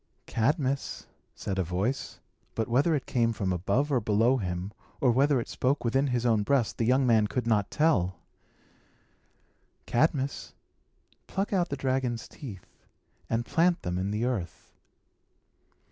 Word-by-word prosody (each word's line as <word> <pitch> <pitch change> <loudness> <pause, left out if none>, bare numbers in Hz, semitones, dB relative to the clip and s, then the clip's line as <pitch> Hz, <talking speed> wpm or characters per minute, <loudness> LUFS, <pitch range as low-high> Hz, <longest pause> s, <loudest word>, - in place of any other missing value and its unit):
"Cadmus," 140 +3 -1 0.3
said 95 -1 -3
a - - +2
voice 95 +10 -2 0.4
but 110 - -1
whether 140 +7 +3
it 140 - -3
came 115 -2 +1
from 95 -4 -1
above 100 - 0
or 130 - +3
below 110 +4 +3
him, 90 -2 -3 0.3
or 125 - +4
whether 135 +2 +3
it 115 - -4
spoke 130 +1 -1
within 135 +4 +2
his 125 -2 -1
own 115 -3 +3
breast, 125 +1 +1
the 115 - +2
young 130 +2 +4
man 110 -3 +4
could 125 +2 -2
not 105 -4 +2
tell 100 - +2 1.7
"Cadmus, 140 +1 0 0.7
pluck 195 +2 -2
out 180 -3 +1
the 140 - -3
dragon's 130 -3 -1
teeth, 105 -11 -9 0.6
and 115 +1 0
plant 170 +5 +2
them 90 0 -2
in 95 +1 -1
the 105 +3 -1
earth." 110 -9 -4
120 Hz, 145 wpm, -28 LUFS, 105-140 Hz, 1.7 s, or